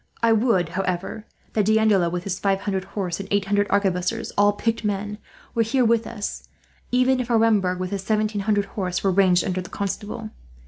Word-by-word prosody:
I 230 - +5
would, 215 -7 +2
however, 190 +4 -3 0.3
that 210 -2 +2
D'Andelot, 215 -5 +3
with 180 0 -3
his 190 -1 -3
five 195 -1 +1
hundred 190 -2 -2
horse 190 -3 -3
and 195 - -7
eight 200 -1 +1
hundred 205 +1 +1
arquebusiers, 200 +3 0
all 205 0 +4
picked 225 +2 -1
men, 205 0 -2 0.3
were 230 - +1
here 245 +3 +2
with 230 0 +2
us; 210 -3 -6 0.4
even 255 +1 +3
if 250 -1 -3
Aremberg, 220 -6 +3
with 185 +1 -4
his 200 -1 -2
seventeen 215 0 0
hundred 205 0 +1
horse, 185 -3 -3
were 195 - +3
ranged 185 -1 +4
under 185 -1 -1
the 185 - -10
Constable. 210 +2 -4
205 Hz, 190 wpm, -23 LUFS, 190-220 Hz, 0.4 s, I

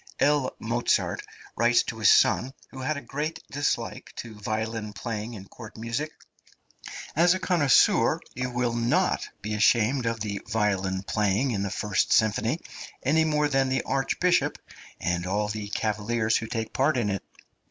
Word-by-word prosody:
L. 145 -2 +2
Mozart 120 +2 0 0.3
writes 120 +1 +4
to 110 - -6
his 105 - +6
son, 130 +2 +3 0.2
who 130 - -9
had 145 +3 -1
a - - -5
great 150 +4 -4
dislike 145 +1 -2
to 115 -2 -7
violin 110 +1 -3
playing 110 +2 -5
in 95 -2 -9
court 115 0 -11
music: 115 +7 -3 1.0
"As 175 +4 +5
a - - -3
connoisseur, 170 -8 +4
you 125 +1 -3
will 120 -1 -1
not 115 0 +1
be 105 +1 -3
ashamed 115 +4 +3
of 115 -1 -2
the 100 -2 -3
violin 95 -4 0
playing 105 +6 +1
in 100 -4 -1
the 100 - -1
first 105 0 0
symphony, 110 +6 +2 0.4
any 160 +4 +3
more 150 -1 +2
than 135 -2 +1
the 130 -1 0
Archbishop 175 +6 +1 0.4
and 90 0 -1
all 105 +2 0
the 105 -1 -4
cavaliers 110 +2 0
who 115 - -4
take 110 -1 -4
part 135 +2 +2
in 105 -4 0
it." 95 - -3
115 Hz, 160 wpm, -26 LUFS, 105-135 Hz, 1.0 s, his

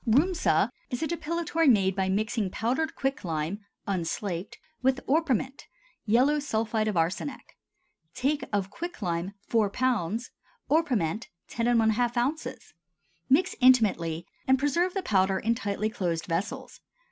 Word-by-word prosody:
RHUSMA 325 +10 +3 0.2
is 245 +3 -3
a - - +1
depilatory 330 0 0
made 195 -6 +4
by 190 -1 0
mixing 215 +1 0
powdered 255 +11 -1
quicklime 180 - -2 0.3
(unslaked) 180 0 -3 0.2
with 265 +1 +2
orpiment 270 -3 0 0.4
(yellow 260 +7 +4
sulphide 220 -5 -1
of 210 -4 -1
arsenic). 180 - -2 0.6
Take 285 +3 0
of: 200 -1 -1
Quicklime 195 - -4
4 220 -3 +2
lb. 235 -1 -1 0.4
Orpiment 235 - +1 0.2
10½ 235 0 +2 0.3
oz. - - -10 0.6
Mix 285 +8 +3
intimately 195 -10 +4 0.2
and 265 0 +5
preserve 340 +7 +1
the 385 - -1
powder 190 -1 +2
in 225 +4 +1
tightly 210 -1 -2
closed 170 -5 -2
vessels. 180 +4 -4
225 Hz, 120 wpm, -28 LUFS, 195-270 Hz, 0.6 s, and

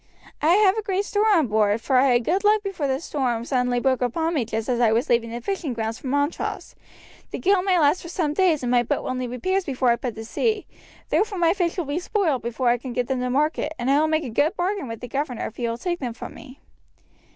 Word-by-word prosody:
I 320 +3 +4
have 405 -1 +4
a - - -1
great 400 -1 -1
store 420 +1 +1
on 340 -8 +4
board, 210 -1 +2
for 260 +4 -1
I 265 +2 +5
had 240 0 +2
good 370 - 0
luck 420 0 +4
before 380 -8 -2
the 265 0 0
storm 250 -7 -2
suddenly 250 -2 +1
broke 260 0 +1
upon 320 +7 0
me 275 -8 0
just 220 0 -3
as 245 -2 0
I 235 -3 +4
was 230 +3 +1
leaving 235 -1 +2
the 235 +1 -5
fishing 335 -3 -3
grounds 225 -1 -3
for - - -8
Montrose. 285 +4 -2 0.6
The - - -5
gale 390 0 +3
may 370 -1 +2
last 305 +2 +3
for 340 - -9
some 320 -4 -1
days, 330 -5 +2
and 245 - -1
my 245 -1 +4
boat 240 - -2
will - - -2
need 255 -1 -3
repairs 375 +11 -1
before 260 -5 +1
I 235 - +2
put 240 -1 -4
to 225 0 -7
sea, 430 - -1 0.4
therefore 420 -2 +1
my 335 -1 +3
fish 350 -3 -1
will 350 - -1
be 285 +4 -2
spoiled 355 - 0
before 240 +1 -1
I 240 0 +2
can 250 0 -6
get 245 0 -1
them 265 -1 0
to 250 0 -1
market, 300 +3 0
and 245 +3 0
I 280 - +4
will 310 - +2
make 315 0 +1
a 260 - -5
good 300 - +1
bargain 375 -2 -2
with 230 -1 -7
the 245 - -6
governor 270 -2 -3
if 220 - -8
he 240 - -1
will 230 - -3
take 345 +6 -3
them 245 -4 -4
from - - -8
me." 275 -2 -13
275 Hz, 265 wpm, -23 LUFS, 240-350 Hz, 0.6 s, I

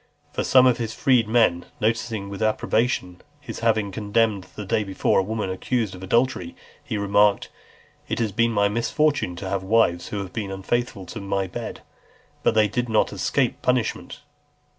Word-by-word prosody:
For - - -1
some 130 -1 +6
of 125 -2 +3
his 110 -2 -3
freedmen 115 -8 +3
noticing 110 -2 -1
with 100 +2 -7
approbation 110 -4 0 0.2
his 145 - -8
having 110 -3 +1
condemned, 105 -1 0
the 105 - -6
day 105 +3 +1
before, 95 -1 +1
a - - +2
woman 105 -1 -3
accused 110 +2 -1
of 90 - -10
adultery, 110 -3 0 0.3
he 110 - -3
remarked, 100 0 +2 0.6
"It - - -1
has 115 -3 0
been 115 +3 +2
my 100 -3 +2
misfortune 120 - 0
to 95 +2 -6
have 100 -1 -1
wives 95 -3 +2
who 105 - -4
have 95 -2 -5
been 105 -3 -3
unfaithful 95 +1 -2
to 110 +4 -7
my 100 0 -1
bed; 90 - -6 0.6
but - - +2
they 110 -1 +5
did 120 +4 -2
not 110 -1 +2
escape - - 0
punishment." 125 +1 -1
105 Hz, 170 wpm, -24 LUFS, 95-115 Hz, 0.6 s, some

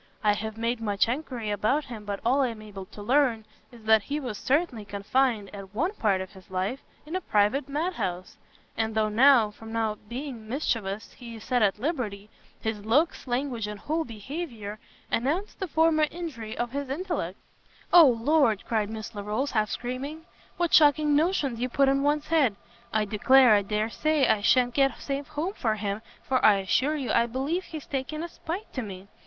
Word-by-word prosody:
I 210 -1 +4
have 220 +1 -5
made 230 +1 -1
much 205 -1 +1
enquiry 245 -4 -3
about 215 +9 +1
him, 225 -4 -8
but 200 -1 -3
all 265 +4 +3
I 265 - +3
am 225 -3 -6
able 195 -3 -9
to 205 - -10
learn, 245 -2 +2 0.3
is 235 -2 -15
that 220 0 +5
he 285 +8 -3
was 245 -7 -5
certainly 275 -5 0
confined, 210 +1 0
at 195 0 -10
one 340 - 0
part 200 - +1
of 190 - -7
his 190 -3 -16
life, 190 +8 -2 0.3
in 315 +4 -6
a 370 - -1
private 225 - +1
mad 320 +6 -1
house: 180 - -4 0.4
and 220 0 -1
though 215 -1 +2
now, 235 -1 +5
from 225 +1 -11
not 215 -2 -2
being 240 -4 -6
mischievous, 220 -6 -2
he 235 -2 -10
is 220 - -10
set 250 -2 +1
at 205 -2 +3
liberty, 215 - -3 0.3
his 220 -2 -3
looks, 280 +8 +1
language, 245 -3 -1
and 210 -1 -6
whole 320 +2 -1
behaviour, 230 - -6 0.3
announce 315 - 0
the 380 - -5
former 315 -1 +3
injury 280 -11 -6
of 240 -1 -2
his 280 0 -4
intellects." 285 - -3 0.5
"O 340 -4 +10
Lord," 240 -2 +2
cried 215 -3 0
Miss 220 +1 -6
Larolles, 210 +7 -2
half 215 -2 +1
screaming, 275 +6 -5 0.3
"what 345 -2 0
shocking 295 -1 +5
notions 295 -7 +1
you 250 +1 -1
put 275 +2 +3
in 275 0 +3
one's 295 +1 +1
head! 290 -10 +3 0.4
I 215 -1 +1
declare 240 +4 +5
I 205 - +5
dare 210 +2 -1
say 310 0 +2
I 210 - +3
sha'n't 245 +3 +3
get 270 0 +2
safe 280 0 -4
home 330 +6 -3
for 220 - 0
him, 205 0 -3 0.2
for 260 -1 0
I 210 - +7
assure 255 +10 +1
you 275 -5 -2
I 235 0 +3
believe 275 +10 -2
he's 310 -3 -8
taken 290 +3 -3
a 345 - -5
spite 355 +6 -6
to 255 - -2
me! 195 -3 -8
240 Hz, 195 wpm, -27 LUFS, 215-290 Hz, 0.5 s, O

